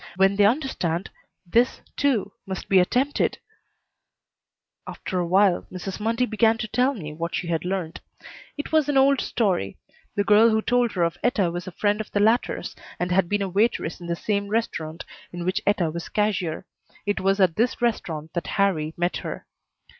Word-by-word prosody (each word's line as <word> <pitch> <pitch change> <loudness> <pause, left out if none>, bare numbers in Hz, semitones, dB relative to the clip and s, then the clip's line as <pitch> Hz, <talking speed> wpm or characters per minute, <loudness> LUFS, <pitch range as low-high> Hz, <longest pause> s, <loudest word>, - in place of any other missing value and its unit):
When 195 +1 +3
they 205 0 +4
understand, 205 - 0 0.3
this, 235 +8 +2 0.2
too, 245 -8 +1 0.2
must 190 -1 -5
be 190 - +6
attempted 255 +10 +1 1.5
After 185 - -4
a 175 - -1
while 190 0 +3
Mrs. 185 +2 -6
Mundy 230 +3 +1
began 225 0 +2
to 225 - -3
tell 255 +5 +1
me 155 -8 -7
what 170 +2 -4
she 170 - -3
had 165 -1 -1
learned. 180 -3 -3 0.6
It 290 - -5
was 310 -2 +3
an 285 - +2
old 270 0 +4
story. 190 - -1 0.4
The 205 - +2
girl 215 +2 +6
who 220 -1 +1
told 245 -1 +2
her 180 - +1
of 170 0 -1
Etta 205 -8 +1
was 175 +1 -5
a - - -5
friend 205 +4 0
of 215 - -8
the 205 - -1
latter's 225 +4 +1 0.2
and 180 0 -1
had 180 -1 +2
been 205 -1 +1
a - - -1
waitress 190 -3 0
in 170 - -7
the 170 - -1
same 200 +2 -1
restaurant 170 -7 -3 0.3
in 175 -1 -5
which 190 +3 0
Etta 180 -6 +2
was 170 +1 -6
cashier. 190 -5 -1 0.4
It 205 0 0
was 195 +1 +2
at 180 -4 +3
this 235 +2 +1
restaurant 160 -10 -2
that 175 - -3
Harrie 160 -6 +1
met 175 +1 0
her. - - -6
200 Hz, 185 wpm, -24 LUFS, 175-225 Hz, 1.5 s, be